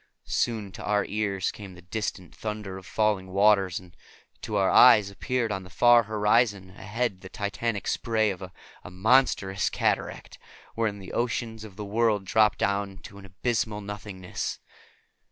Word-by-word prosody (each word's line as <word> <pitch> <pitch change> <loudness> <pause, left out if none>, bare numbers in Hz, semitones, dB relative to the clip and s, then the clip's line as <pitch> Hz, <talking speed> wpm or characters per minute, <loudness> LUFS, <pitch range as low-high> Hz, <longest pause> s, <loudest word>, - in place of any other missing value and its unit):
Soon 110 -4 -1
to - - -9
our 105 +1 +1
ears 100 -3 -1
came 100 -3 -10
the 90 - -14
distant 95 -2 -4
thunder 105 -3 -5
of 95 - -15
falling 105 -3 0
waters, 95 -1 +3
and 90 -3 -17 0.5
to 110 - -4
our 95 -2 +3
eyes 105 -5 +7
appeared 120 +2 -2
on 95 -2 -2
the 90 - -12
far 120 +3 +6
horizon 105 -2 +1
ahead 105 0 -3
the 95 - -10
titanic 100 +2 -3
spray 110 -3 +1
of 95 0 -8
a 90 -1 -8 0.4
monstrous 100 0 +2
cataract, - - -2 0.3
wherein 110 -3 -1
the 95 -2 -10
oceans 115 -2 -2
of 105 -4 -11
the 105 0 -6
world 105 -1 +1
drop 105 +1 +3
down 100 -1 -1
to 100 - -11
abysmal 105 +2 -2
nothingness. 100 -3 -5
105 Hz, 155 wpm, -27 LUFS, 95-110 Hz, 0.5 s, eyes